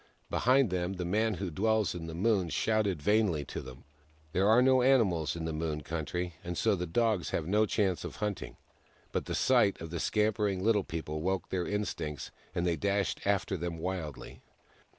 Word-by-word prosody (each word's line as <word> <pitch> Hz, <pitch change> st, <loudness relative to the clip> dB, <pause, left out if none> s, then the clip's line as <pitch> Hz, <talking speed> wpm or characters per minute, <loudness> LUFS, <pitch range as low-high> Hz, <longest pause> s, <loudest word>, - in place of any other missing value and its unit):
Behind 130 Hz, -3 st, +3 dB
them 90 Hz, +1 st, -1 dB
the 90 Hz, -2 st, -4 dB
Man 110 Hz, +4 st, +1 dB
Who 95 Hz, -1 st, -4 dB
Dwells 110 Hz, +4 st, +1 dB
In 85 Hz, -2 st, -6 dB
The 80 Hz, -, -6 dB
Moon 95 Hz, -1 st, +2 dB
shouted 100 Hz, -1 st, 0 dB
vainly 105 Hz, -8 st, +2 dB
to -, -, -5 dB
them. 65 Hz, 0 st, -11 dB, 0.5 s
There 95 Hz, +5 st, +2 dB
are 110 Hz, +2 st, +6 dB
no 130 Hz, 0 st, +5 dB
animals 95 Hz, -, +3 dB
in 85 Hz, -1 st, -4 dB
the 80 Hz, -, -2 dB
Moon 75 Hz, -1 st, -2 dB
Country, 85 Hz, +3 st, -3 dB
and 90 Hz, 0 st, -4 dB
so 110 Hz, -2 st, +3 dB
the 90 Hz, -1 st, -3 dB
Dogs 110 Hz, 0 st, +1 dB
have 80 Hz, -, -1 dB
no 105 Hz, +5 st, +2 dB
chance 95 Hz, -6 st, 0 dB
of -, -, -6 dB
hunting; 105 Hz, -3 st, -4 dB, 0.5 s
but -, -, -2 dB
the -, -, -3 dB
sight 120 Hz, -6 st, +3 dB
of 80 Hz, 0 st, -7 dB
the 85 Hz, -, -3 dB
scampering 105 Hz, -2 st, +1 dB
Little 105 Hz, -2 st, +3 dB
People 75 Hz, -2 st, -4 dB
woke 95 Hz, +2 st, -1 dB
their 90 Hz, -2 st, -1 dB
instincts, 90 Hz, -8 st, -3 dB, 0.2 s
and 85 Hz, -, 0 dB
they 85 Hz, -2 st, +1 dB
dashed 100 Hz, +4 st, 0 dB
after 100 Hz, -1 st, +1 dB
them 85 Hz, -1 st, -4 dB
wildly. 85 Hz, -4 st, -5 dB
95 Hz, 190 wpm, -31 LUFS, 80-105 Hz, 0.5 s, are